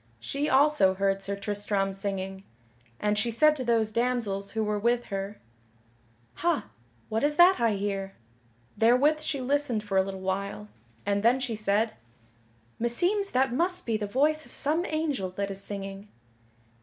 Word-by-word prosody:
She 280 - -2
also 265 -9 +4
heard 195 0 0
Sir 200 +1 -2
Tristram 200 -1 -2
singing, 195 -1 -4 0.6
and 210 0 +1
she 235 - 0
said 305 +7 +4
to 265 - -3
those 230 -3 +1
damsels 220 -4 -1
who 220 -1 0
were 210 -1 -1
with 240 +3 +1
her, 195 +1 -4 1.0
"Ha, 340 -3 0 0.4
what 220 +3 -1
is 295 +1 +2
that 355 +4 +6
I 230 -2 +2
hear?" 195 -1 -3 0.6
Therewith 270 +7 +4
she 305 -2 -2
listened 255 -4 0
for 200 -2 -1
a - - +6
little 190 0 -5
while, 200 +2 -3 0.4
and 200 0 +1
then 240 +4 +4
she 250 -3 -3
said: 215 +1 +1 0.9
"Meseems 355 - +1
that 260 -1 +2
must 360 +6 0
be 230 - 0
the 210 -1 -2
voice 300 +8 +2
of - - -11
some 315 +5 0
angel 300 - -1
that 200 0 -2
is 195 0 -5
singing." 195 0 -6
220 Hz, 160 wpm, -27 LUFS, 200-275 Hz, 1.0 s, that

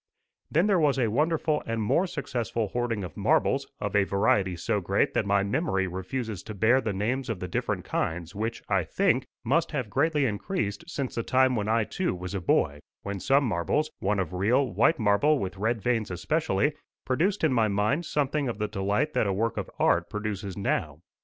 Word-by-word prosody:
Then 165 +5 +3
there 200 -4 +3
was 145 -3 +3
a 120 -5 +1
wonderful 155 +3 +1
and 115 0 -1
more 165 - +2
successful 120 - -3
hoarding 115 -2 -2
of 90 - -7
marbles, - - +2
of - - -3
a 100 - +5
variety 100 -1 +1
so 85 - -1
great - - +1
that - - 0
my 100 0 +3
memory 100 - 0
refuses 95 +4 -4
to 110 - -8
bear 115 +7 +4
the 110 - -2
names 120 +7 -2
of 110 -5 -2
the 90 - -4
different - - -2
kinds, 85 +1 -2
which, 110 +3 -3
I 100 -3 +2
think, 135 - +1 0.2
must 150 +9 +1
have 125 -8 -2
greatly 150 0 +2
increased 110 - -2
since 140 -6 -3
the 115 - -1
time 130 +2 +3
when 105 -2 -1
I 115 +1 +2
too 180 - -2
was 90 +1 -6
a 95 - -2
boy, 75 -3 +1 0.2
when 100 -1 -4
some 140 +8 +3
marbles 120 - 0
one 105 +1 0
of 90 -3 -2
real, 120 +7 +2
white 115 - +3
marble 115 +7 +3
with 95 -5 -4
red 110 +1 -1
veins 115 -3 0
especially 140 - 0 0.3
produced 175 +10 0
in 155 -4 +3
my 115 -3 +3
mind 105 +11 0
something 145 0 0
of 115 - -4
the 105 0 -1
delight 100 +8 -1
that - - +1
a 100 - +1
work 110 +3 0
of - - -4
art - - +2
produces 105 -3 -4
now. 100 - -1
110 Hz, 200 wpm, -27 LUFS, 100-140 Hz, 0.3 s, a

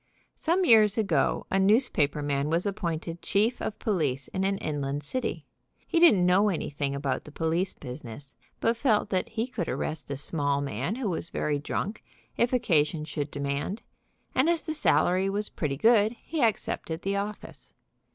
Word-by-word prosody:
Some 355 +3 +1
years 215 - +6
ago 180 -10 +1
a 195 - +2
newspaper 190 - +2
man 140 0 0
was 170 +4 +1
appointed 170 -4 -3
chief 220 +5 +1
of 215 - -3
police 145 - -1
of 190 - -2
an 195 0 +1
inland 145 -2 -3
city. 255 - -3 0.4
He 335 - +1
didn't 215 - +6
know 190 +4 +4
anything 145 -6 -2
about 140 -1 -2
the 150 - -12
police 165 +5 0
business, 130 0 -9 0.3
but 230 - +2
felt 225 -4 +1
that 185 -2 0
he 225 +1 -2
could 230 -10 -4
arrest 155 -1 -3
a 140 - -3
small 145 -1 0
man 140 - -2
who 255 -3 -2
was 170 -2 -2
very 145 -1 -1
drunk, 200 +8 -3 0.3
if 235 - +2
occa 230 - +3
sion 155 0 -5
should 150 -1 -4
demand, 140 +9 -3 0.5
and 270 +6 +3
as 340 -2 +1
the 315 - -3
salary 185 - +2
was 205 +2 -2
pretty 140 -4 -3
good, 220 - +4
he 310 +5 -5
accepted 190 -7 -1
the 195 +1 0
office. 205 +1 -6
180 Hz, 170 wpm, -27 LUFS, 145-215 Hz, 0.5 s, years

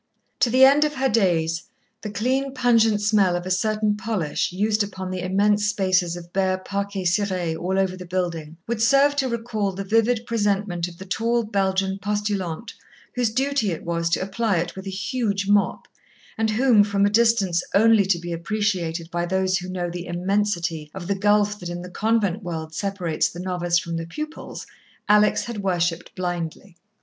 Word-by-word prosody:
To 245 - +3
the 260 +3 +7
end 280 +3 +5
of 300 0 -1
her 265 0 +1
days, 170 -7 +1 0.4
the 210 - -5
clean, 260 +6 -1
pungent 230 -4 +3
smell 205 -4 +3
of 175 0 -3
a 185 - -3
certain 215 +2 +1
polish 205 -9 -2
used 210 +4 +1
upon 190 -2 -4
the 185 - -3
immense 205 +3 +2
spaces 185 -4 +1
of 175 0 -10
bare 190 -1 +1
parquet 200 +1 -4
ciré 180 -2 0
all 180 +4 -2
over 190 -1 +1
the 180 -1 -9
building, 170 -3 -3
would 230 -1 -3
serve 275 +4 +4
to 265 -2 +1
recall 225 -4 -2
the 195 +2 -4
vivid 225 +3 +2
presentment 205 -6 0
of 170 -1 -12
the 190 - -9
tall 230 +5 0
Belgian 195 -2 0
postulante 205 -1 -3 0.4
whose 245 -2 +1
duty 265 -1 0
it 165 - -5
was 170 0 -1
to 170 - +1
apply 205 0 0
it 170 +1 -2
with 190 +1 -8
a - - -2
huge 200 +1 -2
mop, 205 0 +1 0.5
and 220 0 0
whom, 220 -1 +4
from 200 -1 +1
a - - +3
distance 210 -6 +3
only 215 -1 +5
to 195 -3 +2
be 175 0 -6
appreciated 170 -3 -2
by 175 0 -1
those 190 +1 +1
who 180 +1 -7
know 180 -1 -2
the 175 0 -6
immensity 175 -3 -1
of 190 -2 -6
the 200 - 0
gulf 205 +1 +2
that 175 - -6
in 175 0 -5
the 180 - -9
convent 215 -1 0
world 160 -4 -5
separates 180 -3 -1
the 175 - -10
novice 175 -1 0
from 170 -1 -3
the 165 0 -5
pupils, 305 - -7 0.4
Alex 210 0 +4
had 235 -3 -5
worshipped 175 -3 -1
blindly. 175 0 -4
195 Hz, 185 wpm, -23 LUFS, 175-215 Hz, 0.5 s, the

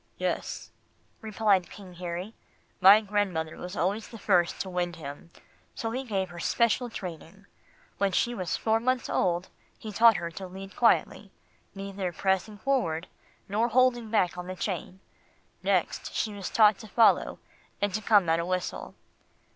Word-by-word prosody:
"Yes," - - -3 0.5
replied 210 -4 +1
King 190 -3 -12
Harry. 180 +4 -5 0.5
"My 200 +3 +8
grandmother 195 -7 -1
was 180 +2 -7
always 200 +6 -1
the 230 - -10
first 180 -5 +2
to - - -4
wind 175 -1 -2
him, 150 +1 -9 0.5
so 225 - -3
he 255 +3 -3
gave 195 -6 -2
her 175 0 -9
special 235 +6 +1
training. 185 -1 -8 0.5
When 200 -1 +2
she 240 +6 +1
was 185 -7 -2
four 220 0 +1
months 255 +1 -1
old, 175 +1 0 0.3
he 215 - -8
taught 225 +1 +6
her 170 0 -4
to 190 +3 -7
lead 190 +1 -10
quietly, 235 - +2 0.4
neither 195 -2 -4
pressing 190 +4 -1
forward, 180 -10 0 0.4
nor 215 +4 +1
holding 240 -1 +2
back 180 -5 +1
on 180 - -6
the 185 - -5
chain. 185 0 -4 0.6
Next, - - 0
she 215 - -1
was 200 -2 -5
taught 210 -3 +5
to 220 - -10
follow, 225 +3 +3 0.4
and 205 -1 0
to 215 - -1
come 205 -4 +4
at 165 +1 +2
a 170 - -1
whistle." 185 0 -3
195 Hz, 160 wpm, -28 LUFS, 180-220 Hz, 0.6 s, My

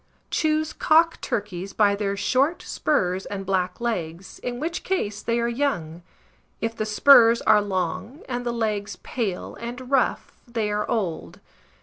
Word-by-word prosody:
Choose 310 -1 +1
cock 330 +1 +3
turkeys 195 -2 -4
by 205 -2 +4
their 200 -1 -2
short 260 - +1
spurs 185 -10 0
and 195 -1 -5
black 185 -1 -1
legs, 185 -6 -4
in 245 -1 -4
which 335 +4 -3
case 210 - -2
they 235 +1 0
are 235 - +1
young; 205 - -2 0.6
if 225 0 -2
the 215 - -2
spurs 230 +1 +7
are 210 - +5
long, 190 - -3
and 245 -1 -3
the 240 - -1
legs 210 -4 -2
pale 210 -7 -3
and 245 +2 -7
rough, 270 -2 +1
they 225 -3 -2
are 210 0 -2
old. 195 -9 -2
220 Hz, 150 wpm, -24 LUFS, 195-245 Hz, 0.6 s, spurs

